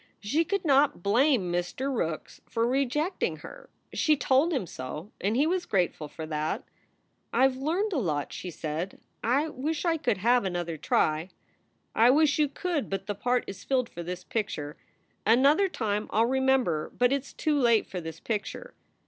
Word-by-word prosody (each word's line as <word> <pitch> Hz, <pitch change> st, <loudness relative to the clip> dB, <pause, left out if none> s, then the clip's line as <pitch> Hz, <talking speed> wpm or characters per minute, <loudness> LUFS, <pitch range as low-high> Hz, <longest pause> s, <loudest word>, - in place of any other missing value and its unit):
She 285 Hz, +11 st, +1 dB
could 395 Hz, +1 st, -1 dB
not 280 Hz, -, +3 dB
blame 225 Hz, -, +3 dB
Mr. 215 Hz, +10 st, -2 dB
Rookes 165 Hz, -7 st, -3 dB
for 230 Hz, 0 st, 0 dB
rejecting 275 Hz, +7 st, 0 dB
her. -, -, -11 dB, 0.2 s
She 305 Hz, -1 st, +3 dB
told 270 Hz, +5 st, +3 dB
him 265 Hz, -, 0 dB
so, 150 Hz, +5 st, -7 dB
and 205 Hz, +3 st, +1 dB
he 285 Hz, -, +4 dB
was 355 Hz, +2 st, 0 dB
grateful 175 Hz, -5 st, 0 dB
for 160 Hz, +2 st, -7 dB
that. 155 Hz, 0 st, -2 dB, 0.7 s
"I 265 Hz, -, +5 dB
ve 260 Hz, -1 st, -4 dB
learned 360 Hz, +9 st, 0 dB
a 305 Hz, -, +1 dB
lot," 150 Hz, -, -2 dB
she 185 Hz, -, -6 dB
said. 160 Hz, +3 st, -4 dB, 0.2 s
"I 275 Hz, +7 st, +2 dB
wish 300 Hz, +4 st, -3 dB
I 330 Hz, -1 st, +2 dB
could 250 Hz, -, 0 dB
have 240 Hz, +5 st, +3 dB
another 175 Hz, -3 st, -2 dB
try." 155 Hz, +2 st, +1 dB, 0.6 s
"I 230 Hz, +2 st, +5 dB
wish 295 Hz, +2 st, +4 dB
you 300 Hz, -2 st, +3 dB
could, 330 Hz, 0 st, -2 dB
but 195 Hz, -1 st, -3 dB
the 205 Hz, -, -2 dB
part 245 Hz, +5 st, 0 dB
is 195 Hz, -, -8 dB
filled 255 Hz, -3 st, 0 dB
for 175 Hz, -, -7 dB
this 180 Hz, +1 st, -5 dB
picture. 160 Hz, -9 st, -3 dB, 0.5 s
Another 280 Hz, -, +4 dB
time 210 Hz, -, -2 dB
I 220 Hz, -, +3 dB
ll -, -, +5 dB
remember, 260 Hz, -10 st, +1 dB
but 245 Hz, +2 st, +3 dB
it 280 Hz, -, +1 dB
s 275 Hz, -, -14 dB
too 300 Hz, -2 st, 0 dB
late 235 Hz, -4 st, +4 dB
for 180 Hz, -, -6 dB
this 160 Hz, 0 st, -7 dB
picture." 230 Hz, -, -4 dB
245 Hz, 180 wpm, -28 LUFS, 180-285 Hz, 0.7 s, I